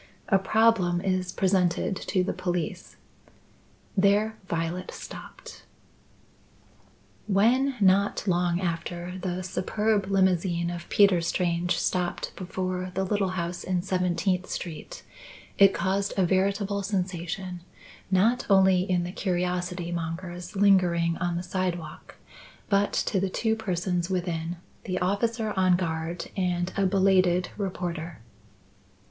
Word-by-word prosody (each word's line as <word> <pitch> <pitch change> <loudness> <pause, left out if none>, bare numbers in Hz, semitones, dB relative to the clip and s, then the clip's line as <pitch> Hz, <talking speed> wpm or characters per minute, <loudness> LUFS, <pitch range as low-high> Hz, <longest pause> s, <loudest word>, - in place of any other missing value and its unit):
A 195 - +5
problem 195 -3 +3
is 185 -1 -1
presented 185 0 +1
to 185 0 -1
the 180 - -2
police 180 0 -3 0.5
" - - -33
There 210 +2 +3
Violet 170 +2 -2
stopped. - - -10 1.7
When, 245 +7 +3
not 200 0 +3
long 175 -1 +2
after, 175 +1 -4
the 185 0 -3
superb 205 +2 0
limousine 180 -3 +1
of 170 0 -7
Peter 200 -4 +5
Strange 175 +1 0
stopped 180 -1 -1
before 185 0 -3
the 190 - +1
little 195 0 0
house 170 0 -3
in 180 -1 -1
Seventeenth 185 0 0
Street, 165 -4 -6 0.6
it 195 -1 +8
caused 195 +1 -1
a 190 - +4
veritable 200 +2 +1
sensation, 185 -2 -3 0.5
not 210 +6 +3
only 190 -2 +5
in 180 -1 +2
the 175 - -4
curiosity 180 -1 -2
mongers 175 +2 -5
lingering 180 -4 +3
on 175 -1 -1
the 175 - -3
sidewalk, 175 -3 -4 0.5
but 200 0 +2
to 195 - 0
the 195 +1 0
two 220 +3 0
persons 180 -4 -2
within 175 -2 -2 0.3
the 185 -1 -2
officer 215 +4 0
on 185 -1 +4
guard 170 -1 -3
and 180 -1 -1
a 195 -1 +2
belated 185 -2 +3
reporter. 175 -4 -4
185 Hz, 120 wpm, -27 LUFS, 175-195 Hz, 1.7 s, it